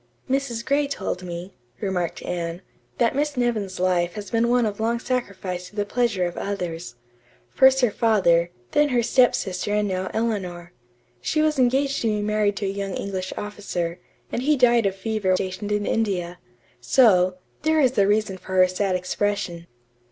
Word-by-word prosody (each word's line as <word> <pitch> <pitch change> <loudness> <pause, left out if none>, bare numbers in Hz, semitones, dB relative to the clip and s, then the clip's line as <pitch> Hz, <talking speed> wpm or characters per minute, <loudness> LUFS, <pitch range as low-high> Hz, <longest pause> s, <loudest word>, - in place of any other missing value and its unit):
"Mrs. 260 -3 -1
Gray 285 +1 +2
told 190 -9 -3
me," 175 +1 -7 0.3
remarked 180 -3 -2
Anne, 170 0 -4 0.3
"that 235 +1 +2
Miss 290 -1 -1
Nevin's 215 -7 -1
life 180 -1 +1
had 205 -2 -7
been 230 +1 +2
one 245 -1 +3
long 230 +2 +1
sacrifice 195 -8 -3
to 210 - -21
the 205 -1 0
pleasure 225 -5 0
of 175 - -4
others. 175 -7 -4 0.6
First 265 0 +5
her 245 -4 +3
father, 180 -7 +3 0.2
then 295 0 +3
her 245 -3 +2
step 245 +1 +4
sister 190 +2 -2
and 210 0 +1
now 185 -1 -2
Eleanor. 185 -6 -3 0.5
She 310 - +1
was 305 -2 +1
engaged 270 +2 +2
to 230 - 0
be 210 -1 0
married 210 -1 +1
to 205 - -2
a - - 0
young 195 -1 -3
English 190 -2 -4
officer, 185 -4 -4 0.3
and - - -2
he 295 +3 +2
died 240 -4 +4
of 190 - -2
fever 205 0 -2
while 185 - +4
stationed 190 +2 -4
in 210 0 0
India. 180 -5 -1 0.4
So, 185 - +4 0.2
there 315 +1 +2
is 260 -3 +3
reason 200 -1 +2
for 190 - -8
her 185 0 +6
sad 185 +1 -1
expression." 180 -2 -2
205 Hz, 175 wpm, -24 LUFS, 185-235 Hz, 0.6 s, her